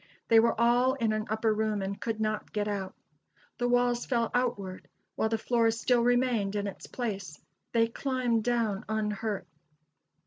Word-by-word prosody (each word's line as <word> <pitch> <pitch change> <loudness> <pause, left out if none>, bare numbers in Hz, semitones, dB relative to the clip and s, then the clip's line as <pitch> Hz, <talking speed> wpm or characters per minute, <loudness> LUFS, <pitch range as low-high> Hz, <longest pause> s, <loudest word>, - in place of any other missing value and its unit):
They 225 - +7
were 230 0 +2
all 245 +2 +4
in 230 -5 0
an 215 0 -2
upper 220 0 +1
room 215 -2 -1
and 195 +1 -4
could 225 -2 -2
not 215 -1 -2
get 210 -1 -1
out. 195 -2 -3 0.6
The 245 - +1
walls 245 0 +2
fell 235 -3 0
outward, 205 -7 -2 0.3
while 220 - 0
the 225 - +1
floor 230 0 +2
still 235 +2 +2
remained 240 -4 +2
in 205 0 -1
its 200 - -7
place. 195 -9 -4 0.3
They 230 -1 +4
climbed 245 -2 0
down 230 -4 0
unhurt. 210 -2 -2
225 Hz, 165 wpm, -29 LUFS, 210-240 Hz, 0.6 s, They